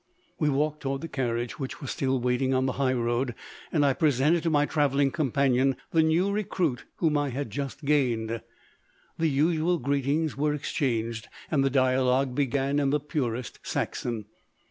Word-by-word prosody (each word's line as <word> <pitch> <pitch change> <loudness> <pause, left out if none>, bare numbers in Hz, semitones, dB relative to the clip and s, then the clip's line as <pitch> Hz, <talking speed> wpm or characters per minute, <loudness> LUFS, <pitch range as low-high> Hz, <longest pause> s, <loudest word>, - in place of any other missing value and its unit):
We 150 - +2
walked 150 +2 0
toward 135 0 -2
the 165 - -4
carriage, 120 -4 -2
which 135 -2 -5
was 140 - -5
still 135 -4 0
waiting 125 +2 +1
on 130 0 +2
the 130 - +1
highroad, 120 -1 0 0.4
and 150 -3 +3
I 140 - +4
presented 150 +3 +2
to 165 - 0
my 145 -2 +3
travelling 140 -2 +2
companion 135 -3 +2 0.2
the 165 - +4
new 165 +5 +2
recruit 180 -9 -1
whom 155 -3 +1
I 145 -1 0
had 130 -2 -4
just 140 +4 -5
gained. 115 -6 +1 0.8
The 165 -1 +2
usual 160 +4 +2
greetings 140 +2 0
were 150 +1 +1
exchanged, 115 -7 -2 0.2
and 140 -3 +3
the 135 - +3
dialogue 130 0 +2
began 140 +1 +1
in 140 -1 +2
the 150 +2 +2
purest 125 -5 -3
Saxon. 115 -4 -3
140 Hz, 165 wpm, -27 LUFS, 130-150 Hz, 0.8 s, I